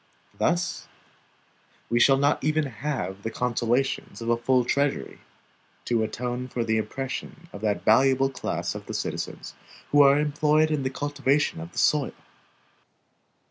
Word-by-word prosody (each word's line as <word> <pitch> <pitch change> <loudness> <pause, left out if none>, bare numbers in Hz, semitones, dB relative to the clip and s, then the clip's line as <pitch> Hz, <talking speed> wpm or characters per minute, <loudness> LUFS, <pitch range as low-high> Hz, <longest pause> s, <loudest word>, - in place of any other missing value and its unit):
Thus 175 +2 -1 1.0
we 120 - +1
shall 135 +2 +6
not 140 0 +1
even 155 +1 +1
have 125 -6 -4
the 110 - -3
consolations 125 +2 -1
of 115 0 -4
a 120 - +4
full 125 +1 +2
treasury, 140 - -1 0.7
to 120 -2 +1
atone 125 +3 -3
for 120 -1 -2
the 110 -1 +1
oppression 135 +8 -5
of 100 - -8
that 105 -2 -1
valuable 135 +4 +4
class - - -3
of - - -9
the - - -5
citizens - - -4 0.4
who 145 - +6
are 140 0 +6
employed 150 +1 +2
in 150 -2 0
the 130 - -1
cultivation 145 +3 0
of 170 +1 -8
the - - -15
soil. 150 -3 +2
135 Hz, 145 wpm, -26 LUFS, 120-145 Hz, 1.0 s, shall